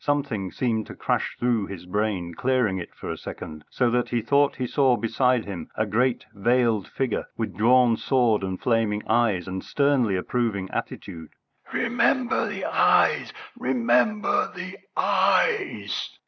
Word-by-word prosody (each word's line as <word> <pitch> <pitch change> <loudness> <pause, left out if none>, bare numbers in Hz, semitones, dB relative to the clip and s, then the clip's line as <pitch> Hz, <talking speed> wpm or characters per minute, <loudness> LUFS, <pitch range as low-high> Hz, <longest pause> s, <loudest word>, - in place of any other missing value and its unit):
Something 135 -10 -1
seemed 115 -4 -1
to - - -9
crash - - -1
through 120 -4 0
his 90 -3 -8
brain, 95 -3 -2
clearing 125 -3 0
it 85 - -9
for - - -6
a - - -5
second, 75 -1 -8
so 125 -2 +1
that 125 0 0
he 120 -2 -1
thought 140 +4 +3
he 130 - -3
saw 130 -1 +2
beside 125 +1 +1
him 90 -5 -7
a 110 - 0
great 120 +4 0
veiled 115 -1 +1
figure, 130 -4 -2
with 115 - -3
drawn 120 +1 +4
sword 120 -5 +2
and 95 -1 -3
flaming 110 -3 0
eyes, 110 -7 +1
and 95 0 -4
sternly 140 -8 +1
approving 100 -1 -2
attitude. 80 -2 -6 0.4
"Remember 245 +1 +1
the - - -4
eyes! - - +3 0.2
Remember 225 -3 +1
the 185 +1 -6 0.2
eyes!" 465 -1 +1
115 Hz, 145 wpm, -25 LUFS, 100-130 Hz, 0.4 s, drawn